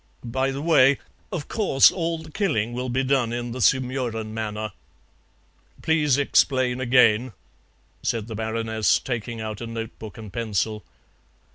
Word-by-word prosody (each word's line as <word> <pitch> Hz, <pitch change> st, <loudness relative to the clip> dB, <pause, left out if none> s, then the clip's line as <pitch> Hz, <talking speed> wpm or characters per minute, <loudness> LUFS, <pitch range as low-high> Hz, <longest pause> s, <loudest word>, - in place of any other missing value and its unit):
By 130 Hz, +3 st, 0 dB
the 135 Hz, +2 st, -4 dB
way, 140 Hz, -5 st, +5 dB, 0.3 s
of 175 Hz, -7 st, -4 dB
course 190 Hz, -11 st, +4 dB
all 165 Hz, -2 st, -2 dB
the 160 Hz, -1 st, -11 dB
killing 120 Hz, -, 0 dB
will 125 Hz, +1 st, -3 dB
be 130 Hz, +2 st, 0 dB
done 130 Hz, -3 st, +1 dB
in 120 Hz, 0 st, -3 dB
the 125 Hz, +2 st, -5 dB
Sumurun 125 Hz, -4 st, 0 dB
manner." 110 Hz, -1 st, -4 dB, 1.1 s
"Please 150 Hz, -4 st, +3 dB
explain 130 Hz, -2 st, +2 dB
again," 125 Hz, -2 st, +4 dB, 0.7 s
said 115 Hz, -3 st, -1 dB
the 115 Hz, -, -7 dB
Baroness, 110 Hz, 0 st, 0 dB
taking 120 Hz, -2 st, -4 dB
out 110 Hz, -1 st, -5 dB
a 115 Hz, -, -5 dB
notebook 115 Hz, -2 st, -7 dB
and 110 Hz, -4 st, -10 dB
pencil. 110 Hz, -2 st, -2 dB
120 Hz, 140 wpm, -24 LUFS, 110-135 Hz, 1.1 s, way